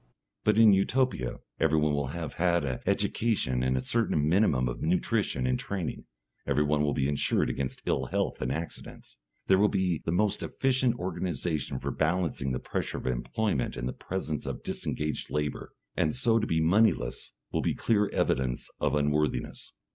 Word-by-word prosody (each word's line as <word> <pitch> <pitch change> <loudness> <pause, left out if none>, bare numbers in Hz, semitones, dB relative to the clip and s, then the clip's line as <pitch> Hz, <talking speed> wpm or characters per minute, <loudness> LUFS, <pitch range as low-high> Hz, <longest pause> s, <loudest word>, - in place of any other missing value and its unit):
But 105 0 +3
in 110 -2 +8
Utopia 100 - +1 0.2
everyone 75 -1 +3
will 70 -2 0
have 80 +3 -5
had 85 -3 +3
an 65 -2 -2
education 100 - +1
and 65 0 +1
a - - 0
certain 80 - +1
minimum 80 -8 +3
of - - -4
nutrition 80 -6 0
and 65 0 +1
training; 95 -5 -4 0.4
everyone 75 +1 +2
will 75 -1 +1
be 70 -1 +1
insured 70 0 +1
against 70 -2 -4
ill - - 0
health - - -2
and 65 0 -1
accidents; 80 +4 -7 0.3
there 95 0 +4
will 105 +1 +5
be 95 -5 0
the - - -1
most 100 +3 +1
efficient 130 -2 +1
organisation 85 - -2
for - - -3
balancing 80 -4 0
the 65 - 0
pressure - - -3
of - - -7
employment 65 - -1
and - - -2
the - - -3
presence 80 -6 -4
of - - -5
disengaged 75 0 -3
labour, 75 -1 -3 0.2
and 80 - +1
so 115 -3 +3
to 110 - -1
be 80 - +1
moneyless 80 - +2 0.2
will - - 0
be - - 0
clear 105 -3 +2
evidence 65 -2 0
of - - +1
unworthiness. 75 +1 -1
80 Hz, 170 wpm, -29 LUFS, 70-100 Hz, 0.4 s, in